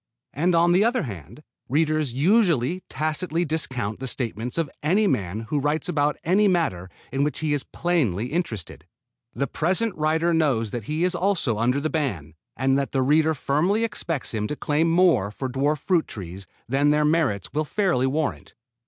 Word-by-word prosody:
And 170 +5 +1
on 170 +1 +4
the 185 +4 +4
other 240 +2 +1
hand, 100 - -9 0.3
readers 155 0 +1
usually 170 - +2
tacitly 160 +2 -1
discount 130 -9 -2
the 135 - -4
statements 120 0 -2
of 165 -2 +1
any 190 +9 +2
man 105 - -1
who 145 +6 -2
writes 150 +3 0
about 145 0 +1
any 195 +5 +3
matter 160 - 0 0.2
in 135 +1 +1
which 150 -2 -1
he 155 -1 0
is 145 - 0
plainly 125 - -1
interested. 120 - -4 0.5
The 140 - 0
present 185 - 0
writer 160 +2 +1
knows 135 -10 +1
that 120 -4 -5
he 155 +6 -1
is 180 0 +1
also 175 - 0
under 125 +4 +2
the 150 - -1
ban, 100 - -2 0.2
and 135 +1 +2
that 140 - -3
the 135 -1 +2
reader 155 +3 +3
firmly 170 +11 +1
expects 165 - -3
him 105 -1 -1
to 150 - -3
claim 155 +3 +1
more 165 - +3
for 130 +5 -5
dwarf 140 +4 0
fruit 170 +3 +1
trees 95 -1 -8 0.2
than 140 +4 +2
their 150 0 +3
merits 150 - 0
will 155 +1 +1
fairly 165 -6 +1
warrant. 150 +3 -3
150 Hz, 180 wpm, -24 LUFS, 125-170 Hz, 0.5 s, on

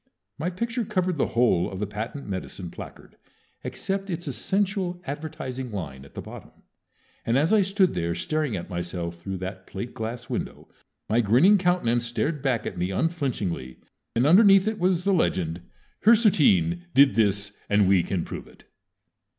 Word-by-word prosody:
My 170 - -1
picture 230 +6 -2
covered 185 -4 -1
the - - +2
whole 115 -8 +3
of 95 - -6
the 105 - -1
patent 110 +7 -6
medicine 95 -2 -5
placard - - -11 0.5
except 195 0 -3
its 175 -1 -4
essential 190 - -1
advertising 135 -4 -5
line 70 -10 -6
at - - -18
the - - -6
bottom, - - -12 0.6
and 115 +2 +1
as 155 +9 +2
I 215 - +6
stood 195 -1 +2
there 85 -1 -1
staring 155 -3 -1
at 85 - -5
myself 85 -1 -4
through 95 +2 -5
that 95 0 -7
plate 100 +5 -6
glass 115 +2 -5
window - - -5 0.4
my 115 +2 +3
grinning 135 - +5
countenance 120 -11 +1
stared 145 +5 -1
back 130 -5 0
at - - -5
me 90 +1 0
unflinchingly, 105 - -2 0.4
and 120 +3 +3
underneath 195 +4 +6
it 220 0 -1
was 180 -1 +2
the 195 0 +2
legend, 90 - 0 0.4
HIRSUTERINE 140 - +4
DID 140 0 +7
THIS 100 -2 +1
AND 100 -1 +4
WE 95 -2 +5
CAN 90 0 -2
PROVE - - -7
IT. - - -19
125 Hz, 165 wpm, -25 LUFS, -, 0.6 s, DID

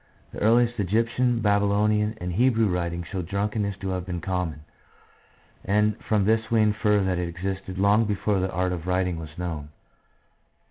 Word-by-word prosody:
The - - -7
earliest 120 +2 +3
Egyptian, 115 +4 +1
Babylonian, 105 +1 +2
and 90 0 -4
Hebrew 115 +2 +3
writings 85 -2 -2
show 95 -3 -2
drunkenness 100 +3 -2
to 95 - -3
have 90 -1 -2
been 90 -1 -3
common, 90 -4 -3 1.0
and 105 +1 +2
from 105 -3 +2
this 110 +1 +1
we 115 -2 +3
infer 105 -1 +2
that 95 -2 0
it 90 -1 -2
existed 95 +2 -5
long 100 +3 +4
before 105 -1 0
the 95 +1 -1
art 90 +1 0
of 85 -1 -6
writing 90 -2 0
was 80 -1 -10
known. 80 -5 -4
100 Hz, 160 wpm, -25 LUFS, 90-105 Hz, 1.0 s, long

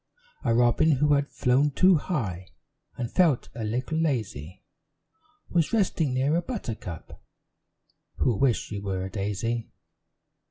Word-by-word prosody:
A 115 -2 +2
robin, 120 +6 +4
who 145 +2 +3
had 140 0 +1
flown 130 +4 +2
too 180 +5 +4
high, 105 - -3 0.5
And 120 -1 -4
felt 165 -9 +2
a 115 -1 -5
little 125 +8 -2
lazy, 110 - -2 0.9
Was 170 +1 +1
resting 170 - +1
near 135 +4 +2
a 170 - +2
buttercup, 115 - -7 0.9
Who 120 - +1
wished 125 +2 +2
she 105 - -5
were 95 -2 -3
a 95 - -7
daisy. 110 +3 -2
125 Hz, 130 wpm, -26 LUFS, 105-150 Hz, 0.9 s, robin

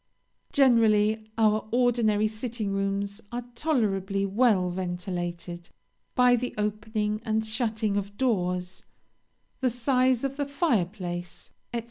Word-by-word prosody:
"Generally 220 -5 +4
our 215 -1 +2
ordinary 230 -3 +3
sitting 215 -1 -3
rooms 195 +1 -1
are 245 +1 -3
tolerably 200 -8 0
well 195 -3 +2
ventilated 175 -1 -4 0.5
by 250 -1 +6
the 245 +1 -3
opening 210 0 -1
and 220 -1 0
shutting 220 -2 -1
of 200 0 -4
doors, 180 -7 -1 0.8
the 260 - +2
size 250 +1 +2
of 275 0 -2
the 285 -1 -1
fire 280 - +2
place, 175 -2 -6 0.2
&c. - - +1
215 Hz, 115 wpm, -27 LUFS, 195-240 Hz, 0.8 s, by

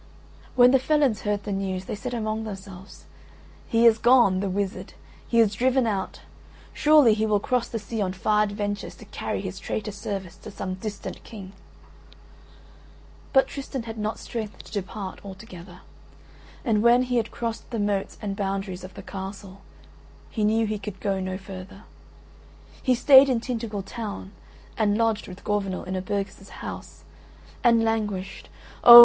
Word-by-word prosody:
When 250 0 +7
the 270 - +5
felons 275 -4 +2
heard 205 -1 -1
the 205 - -4
news 190 -1 -2
they - - -4
said 245 +4 -4
among 220 -1 -2
themselves, 195 -2 -9 0.6
"He 230 +1 +3
is 225 -1 +7
gone, 235 -6 +5
the 200 0 -1
wizard; 195 +1 -3 0.3
he 235 - +3
is 215 -3 +5
driven 255 +4 +2
out. 200 -4 -2 0.5
Surely 295 -7 +6
he 220 +1 +1
will 210 -1 +3
cross 250 +3 0
the 230 - -3
sea 220 +1 -4
on 185 -2 0
far 210 +3 +2
adventures 205 -1 -2
to - - -13
carry - - -3
his - - -5
traitor 210 -1 -3
service 195 -2 -5
to - - -10
some 185 -1 -4
distant 200 +2 -6
King." 195 -4 -10 1.8
But 270 -1 +6
Tristan 270 -3 -5
had 225 -1 -7
not 215 +1 -2
strength 220 -3 -6
to - - -15
depart 200 -1 -5
altogether; 190 -2 -10 0.8
and 220 -4 +3
when 240 +2 +6
he 250 -1 0
had 225 -1 0
crossed 230 -1 -4
the 235 - -3
moats 205 -2 -1
and 200 -1 -2
boundaries 195 -2 -3
of 185 -1 -10
the 195 - -8
Castle 195 0 -7 0.7
he 220 - -1
knew 220 +2 +3
he 215 -1 -2
could 200 -1 -7
go 195 -2 0
no 185 0 -3
further. 195 +1 -10 1.0
He 255 - +3
stayed 270 +2 +8
in 250 -3 +2
Tintagel 225 -4 -3
town 200 -1 -6 0.5
and 210 -1 +3
lodged 225 -2 +1
with 185 +1 -10
Gorvenal 195 -3 -1
in 185 +1 -4
a 185 - -1
burgess' 195 0 -4
house, - - -8 0.6
and 230 -2 +5
languished 205 -4 -2 0.3
oh! 240 0 +13
210 Hz, 165 wpm, -26 LUFS, 195-230 Hz, 1.8 s, oh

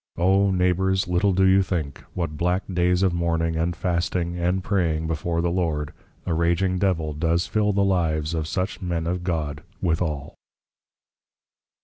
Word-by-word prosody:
O 95 +3 +3
Neighbours, 95 +1 +1
little 90 +3 +2
do 95 +1 +3
you 95 +1 +5
think, 80 -7 -3
what 85 -4 -2
black 90 +4 0
Days 90 +1 +2
of 95 -2 +2
Mourning, 85 -1 0
and 85 +2 0
Fasting, 85 -1 -1
and 90 +2 0
Praying 85 -6 0
before 85 +1 -1
the 85 0 0
Lord, 80 -5 -1 0.3
a 85 - -1
Raging 85 +3 +1
Devil 85 -6 0
does 85 +3 +1
fill 105 -1 +1
the 100 0 +2
lives 80 -5 +1
of 80 -2 -2
such 95 +4 -3
Men 85 -3 -2
of 90 +1 -2
God 75 -5 -2 0.2
withall. 80 -5 -1
85 Hz, 155 wpm, -24 LUFS, 80-95 Hz, 0.3 s, you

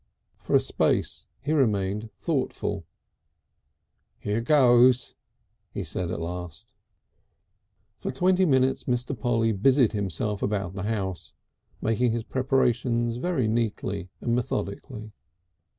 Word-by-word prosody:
For - - 0
a - - +8
space - - 0
he 150 - -2
remained 105 -5 +1
thoughtful. 130 - -2 1.3
"Here 105 +3 -2
goes!" 125 -2 +5 0.6
he - - -5
said 90 -2 -4
at 90 - -3
last. 85 -1 -6
II - - -48 0.2
For - - -3
twenty 185 +7 +3
minutes 130 -2 +2
Mr. 125 +2 -1
Polly 115 -1 +1
busied 125 +4 +3
himself 100 0 -2
about 100 -3 -1
the 95 - -5
house, 95 -7 -3 0.5
making 115 +1 +2
his 115 -1 -2
preparations 120 -2 +1
very 135 -5 0
neatly 105 -4 -2
and 115 - 0
methodically. 110 0 -3
115 Hz, 115 wpm, -26 LUFS, 100-130 Hz, 1.3 s, a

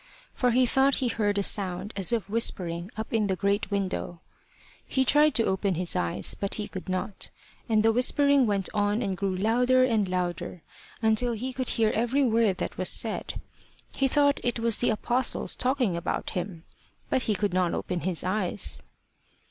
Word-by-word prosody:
For 250 - +1
he 250 +2 +3
thought 270 +2 +3
he 255 - -1
heard 205 -3 -1
a 200 - +1
sound 190 +1 +1
as 195 0 +4
of 225 -6 -1
whispering 180 -5 0
up 220 +1 -6
in 215 -2 +1
the 190 - 0
great 200 +3 -1
window. 190 -3 -3 0.7
He 265 0 +1
tried 295 +3 +4
to 230 - +3
open 190 0 0
his 175 +1 -3
eyes, 85 -1 +1
but 200 - -3
he 210 -1 -4
could 185 -1 -8
not. 185 +2 -3 0.4
And 215 -1 +3
the 225 - +4
whispering 275 +2 +3
went 200 -3 0
on 205 +3 0
and 195 -3 -2
grew 195 0 -2
louder 245 +6 +2
and 220 -6 +1
louder, 180 -2 -3 0.4
until 225 +2 +2
he 255 +4 -4
could 255 -1 -3
hear 220 -1 +1
every 240 +5 +1
word 225 -5 +2
that - - -5
was 185 - +3
said. 225 - 0 0.5
He 270 - +1
thought 285 +1 +2
it 245 -1 0
was 230 -1 +1
the 245 - +2
Apostles 240 +3 -1
talking 250 -7 0
about 170 +1 -3
him. 180 -2 -5 0.5
But 260 - +2
he 215 -3 0
could 200 -1 -1
not 180 -2 +1
open 180 - -3
his 175 -1 -1
eyes. 180 - +1
210 Hz, 185 wpm, -26 LUFS, 185-245 Hz, 0.7 s, as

